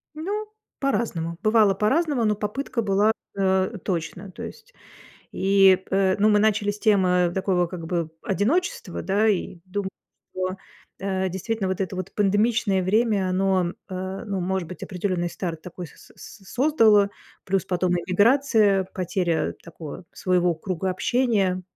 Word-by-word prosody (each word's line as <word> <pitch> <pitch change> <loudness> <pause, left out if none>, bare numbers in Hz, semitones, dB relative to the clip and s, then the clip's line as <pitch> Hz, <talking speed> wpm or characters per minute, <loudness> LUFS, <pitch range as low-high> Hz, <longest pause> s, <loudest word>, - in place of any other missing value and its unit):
Ну, 405 +7 -3 0.3
по-разному, 175 -11 -1
бывало 215 -2 +4
по-разному, 270 - +1
но 210 -1 +2
попытка 230 +4 -3
была, 205 +1 +3 0.3
э, 190 +2 +1
точно. 180 +2 -4
То - - -9
есть - - -10 0.6
и 195 -1 +5
п 190 -1 +2
ну, 210 +1 +4
мы 210 -1 +5
начали 210 -1 +2
с 205 - -6
темы 180 -5 +3
такого, 185 -2 +1
как 170 -2 -7
бы, 170 -2 -2
одиночества, 210 - -1
да, 200 +5 +1
и, 185 -3 -1
дум 190 +1 -3 0.5
о, 185 0 -2 0.4
э, 190 -1 -1
действительно, 195 +2 -2
вот 190 +1 -2
это 185 -1 -2
вот 185 -1 -5
пандемичное 205 -1 +2
время- 205 -1 +2
оно, 185 -1 +1 0.2
э, 190 +2 -5
ну, 195 -2 -2
может 185 -2 -2
быть, 180 - -10
определенный 180 -2 -2
старт 165 -3 -5
такой 180 0 -8
с - - -18
с 200 - -13
создало, 225 -8 +4 0.3
плюс 190 -1 0
потом 180 -1 0
иммиграция, 205 +1 +3
потеря 180 -2 -1
такого 170 0 -9
своего 180 -2 +1
круга 185 +3 -3
общения, 195 -3 +1
190 Hz, 145 wpm, -24 LUFS, 185-210 Hz, 0.6 s, и